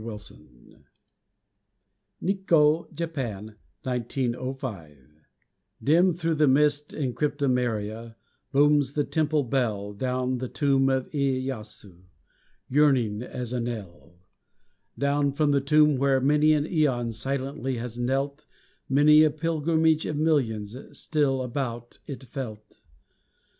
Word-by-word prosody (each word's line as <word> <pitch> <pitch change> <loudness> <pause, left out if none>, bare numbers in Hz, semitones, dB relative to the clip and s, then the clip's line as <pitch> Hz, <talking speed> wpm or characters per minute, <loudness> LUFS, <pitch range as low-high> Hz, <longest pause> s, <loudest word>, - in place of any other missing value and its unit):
EVOCATION 105 - -11 1.4
(NIKKO, 170 -5 +2
JAPAN, 130 - -5 0.3
1905) 125 - -4 0.9
Dim 170 +6 +4
thro' 165 -1 -1
the 150 -1 +3
mist 145 +2 +3
and 130 -5 -2
cryptomeria 120 -6 -1 0.4
Booms 145 -1 +3
the 145 - +1
temple 155 -1 0
bell, 110 -6 -1
Down 125 +3 -2
from 130 - -1
the 130 - -3
tomb 135 0 +2
of 130 -1 0
Iêyasü 130 - -4 0.6
Yearning, 130 -7 +2
as 125 -1 -6
a 125 - -1
knell. 105 -8 -7 0.8
Down 140 0 +1
from 150 0 +1
the 140 -1 +2
tomb 150 0 +4
where 135 0 +2
many 150 +3 +4
an 150 -1 +2
æon 130 -9 0
Silently 135 +2 -3
has 120 0 -6
knelt; 140 +4 -2 0.4
Many 150 +3 +6
a 155 - +5
pilgrimage 160 +1 +1
of 150 - -3
millions 120 -9 0 0.2
Still 140 -4 0
about 120 -2 -5
it 135 -2 -7
felt. 115 -4 -8
135 Hz, 110 wpm, -26 LUFS, 120-150 Hz, 1.4 s, Many